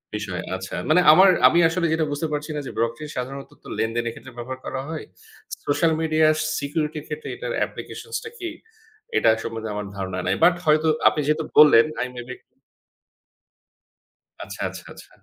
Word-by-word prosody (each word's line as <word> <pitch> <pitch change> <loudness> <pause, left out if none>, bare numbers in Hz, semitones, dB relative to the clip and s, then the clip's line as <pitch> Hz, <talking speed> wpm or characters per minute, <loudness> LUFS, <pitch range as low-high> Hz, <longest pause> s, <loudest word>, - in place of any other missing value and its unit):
বিষয়, 100 -4 -4
আচ্ছা। 95 0 -6
মানে 180 +3 +5
আমার, 190 +5 +7 0.2
আমি 170 - +3
আসলে 170 +1 -1
যেটা 160 -1 +1
বুঝতে 145 +3 -2
পারছি 150 +1 -3
না - - -2
যে - - -6
Blockchain 115 +6 -2
সাধারণত 135 +2 -5
তো - - -13
লেনদেনের 115 +1 -1
ক্ষেত্রে 130 +2 -13
ব্যবহার 130 +2 -6
করা 130 - -3
হয়। 160 -1 -5 0.6
Social 160 +3 +2
media 155 -1 +3 0.3
security 150 +2 -2
এর 150 - -17
ক্ষেত্রে 150 0 -6
এটার - - -5
application - - -9 0.2
টা - - -5
কি? 350 -1 -4 0.7
এটা - - +4
সম্বন্ধে 115 -1 -5
আমার 105 -1 -4
ধারণা 95 -1 -4
নাই। 95 - +2
বাট 175 +1 +6
হয়তো 155 +1 +3 0.2
আপনি 150 - +2
যেহেতু 155 +1 +1 0.2
বললেন 145 -6 +8 0.2
আই 125 - -1
মেবি 125 +1 -7 2.1
আচ্ছা, - - -9
আচ্ছা, - - -10
আচ্ছা। - - -15
145 Hz, 170 wpm, -23 LUFS, 115-160 Hz, 2.1 s, বললেন